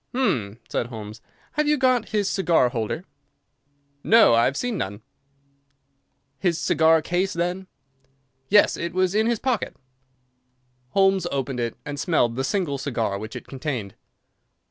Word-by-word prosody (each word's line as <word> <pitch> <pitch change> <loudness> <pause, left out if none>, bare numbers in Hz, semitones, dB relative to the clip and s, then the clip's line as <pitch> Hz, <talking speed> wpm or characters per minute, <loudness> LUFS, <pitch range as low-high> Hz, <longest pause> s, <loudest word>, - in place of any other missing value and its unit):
"Hum!" 115 - 0
said 120 - -2
Holmes, 110 -2 -9 0.3
"have 300 0 0
you 300 0 +3
got 255 -3 +2
his 210 -2 0
cigar 170 -10 +2
holder?" 120 - -3 1.0
"No, 225 - +6
I 115 0 +4
have 140 - 0
seen 245 -2 -2
none." 100 - -4 1.4
"His 175 -3 +1
cigar 160 0 +3
case, 180 +4 0
then?" 180 +2 -2 0.8
"Yes, 205 +1 +5
it 170 0 -4
was 185 0 +2
in 220 +2 +2
his 235 -1 +1
coat - - -25
pocket." 255 -5 -1 1.2
Holmes 195 -2 +3
opened 135 -2 -2
it 115 -1 -3
and 145 -1 -5
smelled 135 -10 +1
the 130 - -1
single 145 -3 -1
cigar 115 -7 -2
which 110 +1 -8
it - - -7
contained. 130 -8 -4
160 Hz, 145 wpm, -24 LUFS, 120-195 Hz, 1.4 s, No